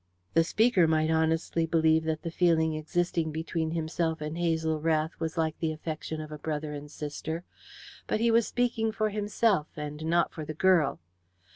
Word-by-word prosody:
The 165 - +5
speaker 195 -1 +3
might 160 0 +2
honestly 160 +1 +1
believe 160 -1 +3
that 160 -1 -2
the 165 - -3
feeling 160 -2 +3
existing 160 +1 -1
between 160 +1 -2
himself 160 0 -1
and 155 +1 -4
Hazel 160 -2 0
Rath 160 0 +1
was 160 +1 -3
like 160 -1 0
the 160 -2 0
affection 155 0 -5
of 155 -1 -7
brother 150 -1 -3
and 145 0 -7
sister, 155 +3 -5 0.6
but - - 0
he 230 +1 +3
was 230 0 +4
speaking 230 -2 0
for 215 0 0
himself, 205 -4 +1
and 150 0 -6
not 170 +1 +2
for 155 - -6
the 155 +1 -6
girl. 170 -4 +3
160 Hz, 170 wpm, -29 LUFS, 155-175 Hz, 0.6 s, The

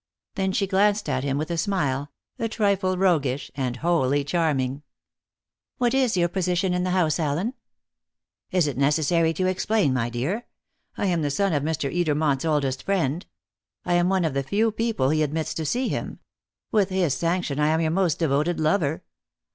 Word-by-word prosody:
Then 190 -2 -1
she 195 - +1
glanced 205 +2 +2
at 130 0 -1
him 140 -1 -1
with 155 +3 -3
a 170 - -1
smile 145 -7 -1 0.3
a 225 - -1
trifle 200 -4 +1
roguish, 145 -8 +1
and 130 -3 -2
wholly 145 -2 +1
charming. 145 -4 0 1.0
"What 245 -1 +1
is 255 -7 +2
your 175 -1 +3
position 180 0 0
in 180 0 0
the 185 - -1
house, 175 -4 +1
Allen?" 165 - -1 1.0
"Is 185 -5 +2
it 140 -3 -3
necessary 160 +3 +2
to 185 +4 -1
explain, 185 -4 +1
my 120 -2 0
dear? 145 - -3 0.5
I - - -1
am 175 -4 +1
the 145 - 0
son 195 +5 0
of 145 - +1
Mr. 155 -1 -2
Edermont's 150 -4 +1
oldest 140 -4 0
friend. 175 -4 0 0.6
I 175 - 0
am 175 +1 +3
one 190 -2 +2
of 155 - -1
the 140 - 0
few 210 +10 +1
people 220 - 0
he 155 0 +1
admits 155 +1 -1
to 160 -2 -3
see 250 - 0
him. - - -4 0.5
With 205 -3 +2
his 185 -6 +1
sanction, 165 -2 -1
I 150 - +3
am 160 +1 +2
your 160 -1 +1
most 175 -3 +1
devoted 160 +2 0
lover. 155 -1 +1
165 Hz, 180 wpm, -24 LUFS, 145-190 Hz, 1.0 s, your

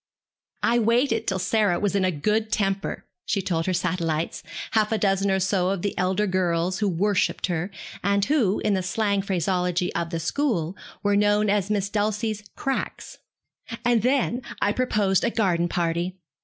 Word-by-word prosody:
'I 240 +1 +3
waited 230 +1 +2
till 190 - +1
Sarah 190 0 +1
was 205 -2 0
in 195 - +2
a 185 - +3
good 215 +7 0
temper,' 195 -1 -1 0.2
she 205 - 0
told 170 -3 -1
her 185 - +1
satellites, 170 -2 -1 0.3
half 215 -1 +2
a 220 - +2
dozen 195 -1 +1
or 190 0 +2
so 190 -1 +1
of 195 -2 -2
the 200 - -1
elder 190 +3 +1
girls 180 -1 0
who 210 -2 +1
worshipped 200 +3 +1
her, 175 +1 -2 0.3
and 200 0 +2
who, 245 -9 +2
in 210 - +1
the 190 - +1
slang 200 +2 0
phraseology 180 -1 0
of 170 -1 -2
the 165 -1 -3
school, 180 - -1 0.3
were 205 0 +3
known 205 0 +3
as 205 -1 +1
Miss 205 -2 0
Dulcie's 210 +1 -1
'cracks,' 270 0 -4 0.7
'and 240 -2 +4
then 250 0 +1 0.2
I 205 - +2
proposed 210 -5 +1
a 235 - +2
garden 180 -7 +1
party. 175 +2 -1
195 Hz, 170 wpm, -25 LUFS, 180-215 Hz, 0.7 s, and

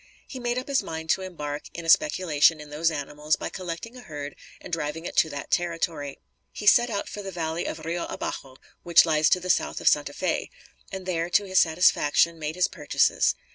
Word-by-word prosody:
He 260 - -8
made 240 0 -1
up 255 - -4
his 280 -2 +2
mind 160 0 -3
to 190 - +1
embark 150 -6 -6
in 170 - -6
a - - -3
speculation 165 - +4
in 150 -1 -11
those 160 +3 +1
animals 150 0 -2
by - - -5
collecting 185 +6 -6
a 250 - -10
herd 145 - -7 0.2
and - - -11
driving 165 +1 -3
it - - -6
to 160 - +4
that 145 -1 -7
territory. 165 -5 -1 0.3
He 210 - -7
set 240 +3 +6
out 200 -3 -3
for 205 - -7
the 195 - -6
valley 165 -1 -3
of 155 - -6
Rio 170 +1 -2
Abajo, 130 -1 -6 0.2
which 170 -1 +6
lies 155 -1 +3
to 180 - +3
the 180 0 +1
south - - 0
of - - -4
Santa - - +3
Fé, - - -2 0.4
and 190 -1 -6
there, 170 -2 -1
to 205 - +3
his 190 -1 +3
satisfaction, 165 0 +3
made 155 +1 -4
his 180 0 +3
purchases. 150 -4 +1
165 Hz, 215 wpm, -26 LUFS, 150-185 Hz, 0.4 s, set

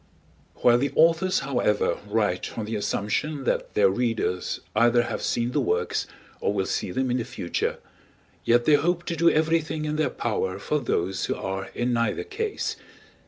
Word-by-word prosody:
While 120 0 +4
the 140 +2 0
authors, 165 +3 +4
however, 125 -6 +1
write 105 -4 -1
on 110 - -2
the 110 +1 -3
assumption 110 +8 -1
that - - -1
their 100 -2 +5
readers 100 -3 -1 0.2
either 120 +2 +4
have - - -4
seen 120 +1 0
the - - +1
works, 450 +2 0 0.3
or - - 0
will 100 -2 0
see - - -2
them 130 +6 -1
in 125 - +1
the 120 - -1
future, 85 - -3 0.7
yet 120 0 +3
they 155 - +5
hope 170 +4 +2
to 170 - -3
do 170 +1 +5
everything 160 0 +1
in 150 0 -2
their 155 -3 +2
power 100 -6 -2
for 150 +9 -1
those 95 -7 -1
who - - -1
are 95 0 -4
in 120 +1 0
neither 115 - 0
case. 435 0 -3
120 Hz, 175 wpm, -25 LUFS, 105-155 Hz, 0.7 s, their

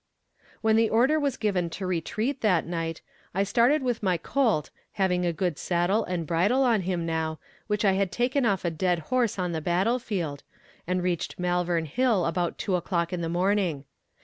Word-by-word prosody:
When 220 0 +3
the 225 -1 +3
order 260 +8 +3
was 280 -4 -1
given 190 -5 0
to 185 +4 -5
retreat 215 - -2
that 185 -7 +2
night, 165 -1 -4 0.3
I 195 - +2
started 240 +8 +3
with 245 -3 -1
my 185 -4 +1
colt, 215 - 0 0.2
having 180 -2 +1
a - - +2
good 170 -1 -2
saddle 175 +5 +1
and 175 -2 -3
bridle 190 - +2
on 230 -5 +3
him 175 -2 -2
now, 160 -1 -2 0.3
which 210 0 0
I 195 - +5
had 190 -1 0
taken 255 +3 +1
off 200 -6 +1
a 170 - +1
dead 175 +2 +1 0.2
horse 245 -5 +2
on 180 -2 -1
the 160 -1 -2
battle 190 +10 +1
field, 175 - -3 0.5
and 180 0 0
reached 180 -2 -2
Malvern 175 -2 0
Hill 220 - +1
about 175 0 -1
two 190 - -1
o'clock 170 -1 -1
in 175 - -2
the 165 - -2
morning. 180 -4 0
185 Hz, 190 wpm, -27 LUFS, 170-220 Hz, 0.5 s, I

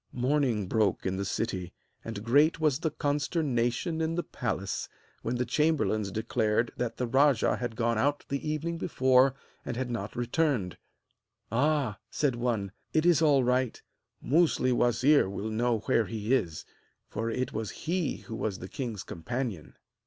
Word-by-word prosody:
Morning 125 -4 +1
broke 110 +1 +1
in 95 0 -1
the 100 - -2
city, 95 -4 -3 0.3
and 110 -2 -6
great 145 +8 +4
was 150 -4 +2
the 160 - 0
consternation 145 0 0
in 160 +1 0
the 175 - -1
palace 100 -6 -3 0.3
when 120 - -2
the 125 +1 0
chamberlains 145 -10 +1
declared 110 +2 0
that 120 -2 -3
the 125 - 0
rajah 135 0 +3
had 120 -2 -4
gone 115 0 +1
out 145 +4 +1
the 140 +2 -3
evening 165 +2 -2
before 130 -4 +3 0.3
and 125 - -4
had 125 -1 -2
not 110 -3 -4
returned. 120 - 0 0.8
'Ah!' 130 -3 +1
said 140 -5 0
one, 115 -5 -1 0.2
'it 155 +1 +2
is 175 -3 +5
all 145 -4 +5
right! 125 -1 0 0.4
Musli 150 -4 +3
wazir 120 +1 +4
will 100 +3 -4
know 115 0 +1
where 115 -2 +2
he 110 +2 -2
is, 85 - 0 0.4
for 115 +1 -3
it 125 +3 -2
was 110 -1 -3 0.2
he 170 -1 -1
who 115 - -6
was 105 -4 -2
the 90 - -8
king's 115 -4 -5
companion.' 115 - -5
125 Hz, 160 wpm, -29 LUFS, 110-145 Hz, 0.8 s, is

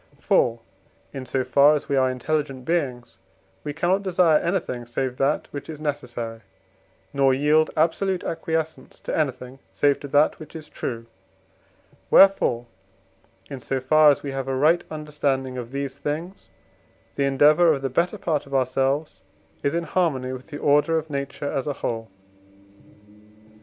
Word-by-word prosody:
For, 115 -1 +2 0.5
in 130 -2 -6
so 130 +1 0
far 140 +4 +5
as 150 - -4
we 140 - 0
are 130 -1 +3
intelligent 130 0 -2
beings, 130 - -2 0.4
we 145 - -3
cannot 175 +6 +1
desire 175 -5 +3
anything 165 -9 -2
save 125 +1 -3
that 140 +2 0
which 145 +1 -7
is 155 -2 -7
necessary, 120 -6 -4 0.7
nor 135 -1 +3
yield 150 +3 +3
absolute 180 +4 +1
acquiescence 160 -1 -4
to - - -3
anything, 135 -3 -3 0.2
save 145 -1 +2
to 145 - -7
that 145 +2 +2
which 155 -1 -12
is 155 -1 -9
true: 115 -2 -5 1.0
wherefore, 190 -11 +5 0.8
in 135 - -7
so 135 +2 -2
far 155 +4 +5
as 145 - +1
we 140 - -4
have 135 -1 -4
a 135 - -1
right 155 +6 +3
understanding 145 -4 -2
of 120 -2 -6
these 140 0 -4
things, 165 +6 -5 0.6
the 140 - 0
endeavour 150 +5 +5
of 140 -3 -1
the - - +1
better 175 +9 0
part 155 -6 -2
of 140 - -5
ourselves 135 +2 0 0.4
is 140 - 0
in 170 - 0
harmony 145 -7 -1
with 130 0 -9
the 145 - -7
order 150 +3 +3
of 160 -1 -4
nature 140 0 -4
as 135 +1 -2
a 145 - -1
whole. 115 -4 -4
140 Hz, 155 wpm, -24 LUFS, 130-155 Hz, 1.0 s, far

